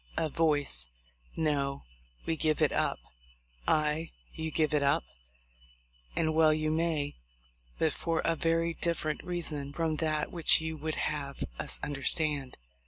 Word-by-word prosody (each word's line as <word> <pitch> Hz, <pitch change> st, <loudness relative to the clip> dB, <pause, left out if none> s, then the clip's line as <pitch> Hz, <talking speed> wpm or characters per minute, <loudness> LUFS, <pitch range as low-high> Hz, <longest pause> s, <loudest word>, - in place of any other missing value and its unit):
[A 160 Hz, -, +1 dB
voice 145 Hz, -, +1 dB, 0.5 s
'No, 140 Hz, -3 st, 0 dB, 0.4 s
we 165 Hz, -, 0 dB
give 155 Hz, -1 st, +1 dB
it -, -, +4 dB
up'] -, -, +1 dB, 0.7 s
Aye! 155 Hz, +1 st, +2 dB, 0.2 s
you 160 Hz, -1 st, -3 dB
give 155 Hz, 0 st, +1 dB
it 150 Hz, -, +3 dB
up, 140 Hz, -, +3 dB, 1.1 s
and 160 Hz, -1 st, +1 dB
well 155 Hz, 0 st, +6 dB
you 155 Hz, 0 st, +1 dB
may; 160 Hz, -3 st, 0 dB, 0.6 s
but 160 Hz, -2 st, +2 dB
for 165 Hz, -1 st, -1 dB
a 165 Hz, -, +3 dB
very 165 Hz, +1 st, +1 dB
different 165 Hz, -3 st, -1 dB
reason 160 Hz, -5 st, -2 dB
from 160 Hz, 0 st, 0 dB
that 155 Hz, -1 st, 0 dB
which 170 Hz, -3 st, +4 dB
you 160 Hz, 0 st, -3 dB
would 155 Hz, +1 st, -3 dB
have 140 Hz, -2 st, -2 dB, 0.2 s
us -, -, +1 dB
understand. 145 Hz, -1 st, 0 dB
155 Hz, 140 wpm, -31 LUFS, 145-160 Hz, 1.1 s, well